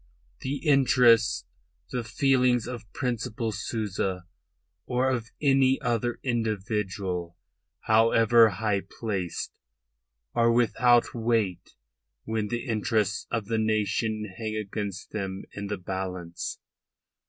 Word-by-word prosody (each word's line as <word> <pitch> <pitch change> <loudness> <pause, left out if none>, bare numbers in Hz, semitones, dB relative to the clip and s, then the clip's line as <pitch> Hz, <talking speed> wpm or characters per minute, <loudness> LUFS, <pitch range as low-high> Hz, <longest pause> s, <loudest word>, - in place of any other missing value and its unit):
The 135 +2 -3
interests, 120 - +5 0.5
the 125 -2 -2
feelings 125 0 +2
of 120 -4 -7
Principal 120 -3 -2
Souza 100 -3 -3 0.6
or 130 +1 +1
of 115 -3 -2
any 135 -2 +4
other 120 +1 -1
individual, 100 -6 -2 0.4
however 115 +1 +5
high 100 0 0 0.2
placed, 95 -7 -3 0.8
are 115 -1 +4
without 120 0 +3
weight 110 -6 -1 0.5
when 110 -1 -2
the 120 +3 -3
interests 110 -3 0
of 115 -3 -2
the 110 +1 0
nation 110 0 0
hang 110 -1 -3
against 100 -2 -4
them 95 -2 -4
in 100 0 -5
the 105 0 -3
balance. 90 -2 -5
110 Hz, 105 wpm, -27 LUFS, 100-120 Hz, 0.8 s, interests